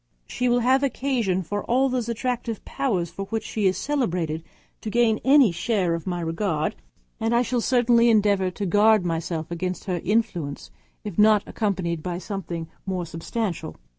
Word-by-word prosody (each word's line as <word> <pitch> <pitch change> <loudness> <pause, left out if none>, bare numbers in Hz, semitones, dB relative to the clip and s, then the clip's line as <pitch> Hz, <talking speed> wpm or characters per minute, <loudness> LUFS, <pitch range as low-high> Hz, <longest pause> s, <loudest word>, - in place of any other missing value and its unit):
She 250 0 -1
will 245 0 +3
have 260 +3 +3
occasion 245 -8 0
for 205 +5 -3
all 260 +3 +3
those 250 -3 -2
attractive 235 -1 -3
powers 185 -11 -1
for 195 - -5
which 225 +2 -3
she 215 -3 0
is 185 - +1
celebrated 175 - -1 0.4
to 220 - -4
gain 230 -1 +2
any 270 -6 +6
share 185 -1 0
of 165 +2 -4
my 175 -1 -2
regard; 165 +1 -1 0.5
and 225 +1 +1
I 240 - +4
shall 245 -1 -1
certainly 240 -1 +4
endeavour 205 -4 +3
to 200 +3 -4
guard 205 +1 +4
myself 165 -1 -3
against 180 +2 -3
their 180 -3 -1
influence, 185 -8 -1 0.3
if 210 -2 -5
not 210 -1 +5
accompanied 185 -6 -2
by 175 +1 -3
something 175 -3 -5 0.2
more 185 -2 -2
substantial. 170 0 -4
205 Hz, 165 wpm, -24 LUFS, 175-235 Hz, 0.5 s, any